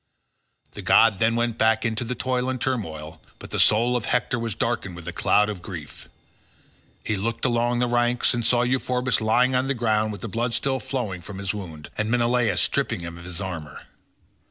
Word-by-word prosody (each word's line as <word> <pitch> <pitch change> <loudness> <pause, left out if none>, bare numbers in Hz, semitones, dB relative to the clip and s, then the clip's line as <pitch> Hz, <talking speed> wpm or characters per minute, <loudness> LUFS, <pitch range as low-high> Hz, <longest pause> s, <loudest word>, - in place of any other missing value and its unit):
The - - -8
god 110 -4 +5
then 115 +1 +3
went 120 -1 -1
back 110 0 +3
into 110 0 -1
the 125 +1 -3
toil 130 0 -1
and 130 -1 -2
turmoil, 80 -12 -3 0.2
but - - -11
the - - -2
soul 120 +3 +4
of 120 - -1
Hector 125 0 0
was 115 -3 -3
darkened 110 -6 -2
with 85 -1 -10
a 90 - -4
cloud 105 +4 +3
of 105 -4 -5
grief; 85 -5 -9 0.9
he 105 - -1
looked 115 +5 -2
along 120 0 +1
the 125 0 +1
ranks 120 0 +2
and 120 -1 -1
saw 120 +1 +3
Euphorbus 125 -1 0
lying 125 +4 +3
on 130 +1 +1
the 140 - 0
ground 110 -2 +1
with 105 - -8
the - - -4
blood 115 +3 -1
still 135 0 0
flowing 125 -10 -3
from 95 +3 -9
his 100 -1 -2
wound, 85 -7 -8
and 110 0 0
Menelaus 120 -5 +2
stripping - - 0
him 85 0 -7
of 85 - -11
his 90 -1 -5
armour. 85 -7 -6
115 Hz, 205 wpm, -24 LUFS, 95-125 Hz, 0.9 s, god